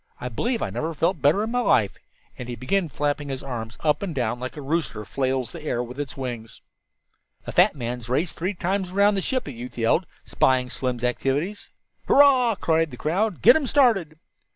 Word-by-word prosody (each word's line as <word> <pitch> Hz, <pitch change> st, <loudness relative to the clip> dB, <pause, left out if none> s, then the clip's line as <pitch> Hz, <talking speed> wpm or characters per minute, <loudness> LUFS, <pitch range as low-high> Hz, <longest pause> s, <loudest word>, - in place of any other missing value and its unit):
I 125 Hz, -, -4 dB
believe 230 Hz, -, -1 dB
I -, -, -3 dB
never 160 Hz, +1 st, -3 dB
felt 170 Hz, +2 st, 0 dB
better 155 Hz, +9 st, +3 dB
in 220 Hz, -, -3 dB
my 245 Hz, -, +1 dB
life," 110 Hz, -, +2 dB, 0.4 s
and 125 Hz, -1 st, -8 dB
he 120 Hz, -, -4 dB
began 170 Hz, +8 st, -1 dB
flapping 145 Hz, 0 st, -2 dB
his 135 Hz, -1 st, -4 dB
arms 120 Hz, -3 st, -6 dB
up 150 Hz, -2 st, +1 dB
and 185 Hz, -6 st, -4 dB
down 120 Hz, -2 st, -1 dB
like 130 Hz, +3 st, -6 dB
a -, -, -5 dB
rooster 135 Hz, -8 st, -2 dB
flails 130 Hz, +3 st, -1 dB
the 170 Hz, -, -9 dB
air 125 Hz, -5 st, -2 dB
with 125 Hz, +3 st, -9 dB
its 140 Hz, -2 st, -5 dB
wings. 120 Hz, -4 st, -6 dB, 0.9 s
"A -, -, -5 dB
fat -, -, +4 dB
man's 120 Hz, -2 st, -5 dB
race 150 Hz, +7 st, 0 dB
three 185 Hz, +4 st, -3 dB
times 190 Hz, +1 st, -1 dB
around 200 Hz, +2 st, +3 dB
the 195 Hz, -, 0 dB
ship!" 255 Hz, +6 st, -1 dB
a 145 Hz, -, -6 dB
youth 125 Hz, 0 st, -9 dB
yelled, 120 Hz, +10 st, +2 dB, 0.2 s
spying 130 Hz, -1 st, +1 dB
Slim's 125 Hz, -2 st, -3 dB
activities. 140 Hz, +10 st, -1 dB, 0.4 s
"Hurrah!" 260 Hz, -5 st, +5 dB
cried 165 Hz, -3 st, +1 dB
the 125 Hz, -, -10 dB
crowd. 185 Hz, -, -1 dB
"Get 240 Hz, -, +9 dB
them 295 Hz, -2 st, 0 dB
started." 220 Hz, -, +3 dB
145 Hz, 200 wpm, -24 LUFS, 125-190 Hz, 0.9 s, Get